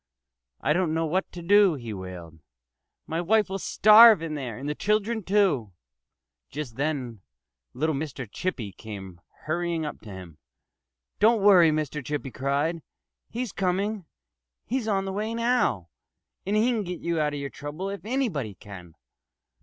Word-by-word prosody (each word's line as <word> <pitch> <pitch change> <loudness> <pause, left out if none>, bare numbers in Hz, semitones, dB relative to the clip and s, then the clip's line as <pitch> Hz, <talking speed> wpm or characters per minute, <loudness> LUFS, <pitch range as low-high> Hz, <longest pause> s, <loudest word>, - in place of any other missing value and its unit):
"I 150 - +2
don't 170 -2 0
know 165 0 0
what 185 +5 -1
to 175 - -9
do," 200 -1 +5
he 120 -5 -6
wailed. 90 -4 -9 0.7
"My 165 +2 -2
wife 210 +3 +2
will 195 0 -3
starve 215 -2 +7
in 160 -2 -4
there 130 -7 -5
and 135 +3 -6
the 150 - -1
children, 215 +5 0
too." 180 - +1 0.8
Just 140 -5 -6
then 135 -7 -3 0.5
little 155 +5 0
Mr. 135 -4 -5
Chippy 115 - -4
came 95 -3 -10 0.2
hurrying 170 0 -2
up 150 - -6
to 110 - -12
him. 90 -5 -10 0.8
"Don't 220 -1 +4
worry!" 185 -5 +7
Mr. 150 -1 -2
Chippy 140 0 -4
cried. 145 +6 -1 0.5
"He's 245 -2 -4
coming! 195 +1 -1 0.6
He's 245 -1 -2
on 195 -2 0
the 190 - -4
way 215 +3 -3
now; 230 - +1 0.6
and 205 - +1
he 225 +4 +3
can 230 -3 0
get 180 -3 -6
you 170 -1 -1
out 150 -1 0
of - - -4
your 140 -1 -5
trouble 150 - -6
if 200 -4 -7
anybody 205 - -2
can." 90 -5 -12
160 Hz, 160 wpm, -26 LUFS, 130-200 Hz, 0.8 s, starve